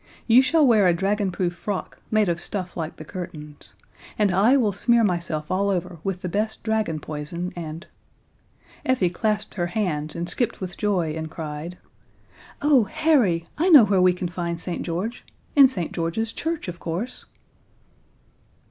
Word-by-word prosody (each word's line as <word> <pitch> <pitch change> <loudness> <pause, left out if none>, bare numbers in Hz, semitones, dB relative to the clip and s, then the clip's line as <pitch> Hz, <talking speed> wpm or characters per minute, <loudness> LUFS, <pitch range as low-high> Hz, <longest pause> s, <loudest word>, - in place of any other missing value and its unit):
"You 240 +2 +7
shall 310 +3 +3
wear 215 -6 +5
a 175 - +3
dragonproof 190 -1 0
frock, 185 +2 -5
made 215 -2 +2
of 170 -1 0
stuff 185 -2 -4
like 160 -2 -4
the 155 - -10
curtains. 150 -4 -9 0.4
And 205 -3 +2
I 220 +9 +5
will 225 -6 +2
smear 235 +4 +3
myself 170 -5 -1
all 200 +2 +1
over 180 -3 -2
with 190 -2 -3
the - - -1
best 210 +5 -2
dragon 220 -8 0
poison, 155 +4 -5
and 165 0 -6 0.5
" - - -35
Effie 220 -9 +1
clasped 210 +2 -1
her 175 -3 -1
hands 170 -6 -2
and 170 0 -3
skipped 235 +6 0
with 180 -2 -6
joy 185 -7 0
and 160 0 -4
cried: 160 +2 -6 0.9
"Oh, 280 -6 +5
Harry! 255 - +2
I 350 +4 +3
know 290 -10 +9
where 195 -2 +2
we 180 0 +6
can 180 0 -3
find 170 -1 -4
St. 175 0 -4
George! 185 +8 -4 0.3
In 280 -2 +9
St. 180 - -3
George's 175 +7 -2
Church, 325 -5 -3
of 175 -1 -6
course." 180 +10 -4
185 Hz, 165 wpm, -24 LUFS, 170-220 Hz, 0.9 s, know